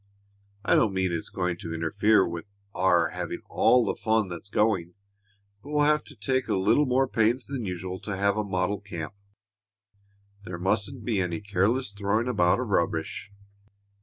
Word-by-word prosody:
I -, -, +3 dB
don't 105 Hz, -4 st, +3 dB
mean 95 Hz, -1 st, +1 dB
it's 85 Hz, -1 st, -3 dB
going 90 Hz, -1 st, -2 dB
to 80 Hz, -1 st, -6 dB
interfere 95 Hz, +6 st, +3 dB
with 85 Hz, 0 st, -6 dB, 0.3 s
our 90 Hz, -2 st, +3 dB
having -, -, -5 dB
all 125 Hz, -1 st, +4 dB
the -, -, 0 dB
fun 110 Hz, -3 st, 0 dB
that's 90 Hz, +3 st, -7 dB
going, 95 Hz, -5 st, +1 dB, 0.7 s
but 145 Hz, -, -12 dB
we'll 150 Hz, 0 st, +2 dB
have 150 Hz, 0 st, +3 dB
to -, -, -11 dB
take 130 Hz, +4 st, -1 dB
a -, -, +1 dB
little 115 Hz, +10 st, +3 dB
more 130 Hz, +1 st, +2 dB
pains 120 Hz, +2 st, +1 dB
than 135 Hz, -5 st, -4 dB
usual 90 Hz, 0 st, -4 dB
to 100 Hz, -2 st, -5 dB
have 100 Hz, 0 st, +2 dB
a 105 Hz, -, 0 dB
model 100 Hz, +1 st, -1 dB
camp. 90 Hz, -6 st, -6 dB, 1.3 s
There 90 Hz, -2 st, -6 dB
mustn't 105 Hz, +6 st, -1 dB
be 105 Hz, -4 st, +1 dB
any 90 Hz, -2 st, -2 dB
careless 105 Hz, +5 st, 0 dB
throwing 100 Hz, +3 st, 0 dB
about 90 Hz, -5 st, +3 dB
of 125 Hz, -3 st, -3 dB
rubbish. 85 Hz, +2 st, -1 dB
100 Hz, 170 wpm, -27 LUFS, 90-115 Hz, 1.3 s, all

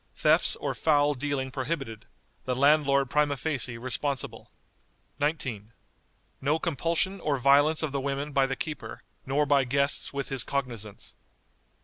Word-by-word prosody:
Thefts -, -, +4 dB
or -, -, -3 dB
foul 145 Hz, -2 st, +3 dB
dealing 135 Hz, -1 st, -3 dB
prohibited; 130 Hz, -5 st, -4 dB, 0.4 s
the 125 Hz, -, -1 dB
landlord 140 Hz, 0 st, +4 dB
prima 150 Hz, -1 st, +2 dB
facie 130 Hz, -6 st, -1 dB
responsible." 130 Hz, +2 st, -3 dB, 0.7 s
"19. 130 Hz, -8 st, -2 dB, 0.7 s
No 145 Hz, +3 st, +2 dB
compulsion 170 Hz, +4 st, -1 dB
or 150 Hz, -4 st, 0 dB
violence 145 Hz, +5 st, +4 dB
of 155 Hz, -, -1 dB
the 140 Hz, 0 st, -2 dB
women 140 Hz, +2 st, -3 dB
by 135 Hz, -1 st, +3 dB
the 135 Hz, -, -2 dB
keeper, 155 Hz, -1 st, -6 dB, 0.2 s
nor 145 Hz, +3 st, +2 dB
by 140 Hz, -1 st, +4 dB
guests 140 Hz, +2 st, 0 dB
with 140 Hz, 0 st, -4 dB
his 135 Hz, -2 st, 0 dB
cognizance." 120 Hz, -7 st, -4 dB
140 Hz, 135 wpm, -27 LUFS, 130-150 Hz, 0.7 s, Thefts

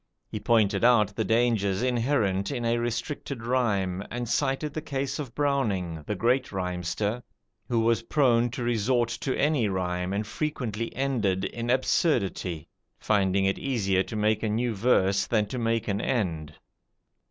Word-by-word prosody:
He 105 Hz, -, -5 dB
pointed 105 Hz, -3 st, +2 dB
out 110 Hz, -4 st, +4 dB
the 110 Hz, -, 0 dB
dangers 110 Hz, -3 st, +1 dB
inherent 115 Hz, -6 st, +1 dB
in 120 Hz, -4 st, -3 dB
a 115 Hz, 0 st, +1 dB
restricted 120 Hz, +1 st, -4 dB
rhyme, 100 Hz, -7 st, 0 dB
and 120 Hz, 0 st, -4 dB
cited 140 Hz, +4 st, 0 dB
the 155 Hz, -, -3 dB
case 140 Hz, 0 st, -3 dB
of 135 Hz, -6 st, -6 dB
Browning, 105 Hz, -, 0 dB
the 105 Hz, -, -1 dB
great 125 Hz, +6 st, +1 dB
rhymster, 95 Hz, +4 st, -2 dB, 0.5 s
who 115 Hz, -2 st, +1 dB
was 115 Hz, 0 st, +2 dB
prone 120 Hz, -2 st, +2 dB
to 125 Hz, +1 st, -5 dB
resort 120 Hz, +1 st, +1 dB
to 130 Hz, +3 st, -3 dB
any 145 Hz, -6 st, +2 dB
rhyme, 90 Hz, -1 st, -2 dB
and 100 Hz, +2 st, -1 dB
frequently 115 Hz, -5 st, -3 dB
ended 110 Hz, -9 st, 0 dB
in 120 Hz, 0 st, -4 dB
absurdity, 100 Hz, -, 0 dB, 0.3 s
finding 100 Hz, -2 st, +1 dB
it 95 Hz, -, 0 dB
easier 100 Hz, -8 st, +1 dB
to 110 Hz, -, -5 dB
make 105 Hz, 0 st, +1 dB
a 110 Hz, -, -1 dB
new 115 Hz, +2 st, 0 dB
verse 100 Hz, -2 st, +2 dB
than 110 Hz, -3 st, +2 dB
to 125 Hz, +5 st, -5 dB
make 115 Hz, -1 st, 0 dB
an 100 Hz, 0 st, -1 dB
end. 80 Hz, -, -2 dB
115 Hz, 155 wpm, -27 LUFS, 100-125 Hz, 0.5 s, out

